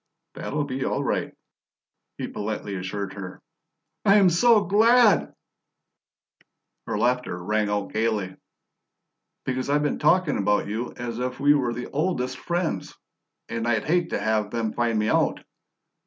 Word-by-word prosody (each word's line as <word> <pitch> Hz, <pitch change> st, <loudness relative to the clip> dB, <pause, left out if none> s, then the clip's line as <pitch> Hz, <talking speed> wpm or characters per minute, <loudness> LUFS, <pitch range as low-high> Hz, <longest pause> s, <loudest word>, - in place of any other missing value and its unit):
"That'll 145 Hz, +1 st, -3 dB
be 130 Hz, -1 st, -3 dB
all -, -, -1 dB
right," -, -, -1 dB, 0.9 s
he -, -, -4 dB
politely 105 Hz, -1 st, -4 dB
assured 95 Hz, +1 st, -4 dB
her. 95 Hz, -2 st, -8 dB, 0.6 s
"I 200 Hz, -, +5 dB
am 195 Hz, -4 st, +6 dB
so 220 Hz, +4 st, +5 dB
glad." 220 Hz, +2 st, +4 dB, 1.6 s
Her -, -, -2 dB
laughter 125 Hz, -6 st, 0 dB
rang 105 Hz, +2 st, 0 dB
out 105 Hz, -1 st, -2 dB
gaily. 110 Hz, -4 st, -1 dB, 1.1 s
"Because 130 Hz, +1 st, -2 dB
I've 145 Hz, +1 st, +2 dB
been 145 Hz, -, -1 dB
talking 170 Hz, +1 st, +3 dB
about 105 Hz, +1 st, +1 dB
you 110 Hz, +4 st, -3 dB
as 120 Hz, -1 st, -5 dB
if 125 Hz, +1 st, -3 dB
we 145 Hz, +1 st, +5 dB
were 125 Hz, -5 st, 0 dB
the 125 Hz, -, -5 dB
OLDEST 140 Hz, -4 st, -1 dB
friends, 175 Hz, -1 st, -2 dB, 0.5 s
and 115 Hz, 0 st, -3 dB
I'd 110 Hz, -2 st, +1 dB
hate 170 Hz, +2 st, +1 dB
to -, -, -2 dB
have 110 Hz, -1 st, 0 dB
them 115 Hz, -1 st, -2 dB
find 115 Hz, -2 st, 0 dB
me 105 Hz, 0 st, +1 dB
out. -, -, +1 dB
125 Hz, 145 wpm, -25 LUFS, 105-155 Hz, 1.6 s, am